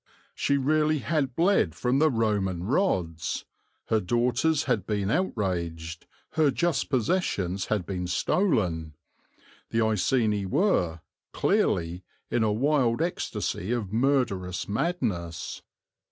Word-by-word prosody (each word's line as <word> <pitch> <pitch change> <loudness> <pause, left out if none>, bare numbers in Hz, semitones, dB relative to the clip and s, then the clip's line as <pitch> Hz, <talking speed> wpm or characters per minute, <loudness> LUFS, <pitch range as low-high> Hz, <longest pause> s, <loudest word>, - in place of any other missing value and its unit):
She 140 - +1
really 155 +3 +2
had 140 -4 -1
bled 170 - +3
from 125 +8 +1
the 155 +1 +5
Roman 105 - 0
rods, 90 - 0 0.4
her 110 - +3
daughters 125 - +1
had 120 - -1
been 100 -2 0
outraged, 85 - -2 0.2
her 155 -2 +3
just 150 -1 0
possessions 105 - 0
had 105 -5 0
been 90 -1 -3
stolen; 90 - 0 0.7
the 115 0 +1
Iceni 105 -1 +1
were, 95 - +1 0.3
clearly, 85 +2 +1 0.3
in 120 - +1
a 110 -1 +2
wild 125 +1 +2
ecstasy 160 - -2
of 110 -5 -2
murderous 115 -8 0
madness. 100 - -2
110 Hz, 110 wpm, -27 LUFS, 90-140 Hz, 0.7 s, the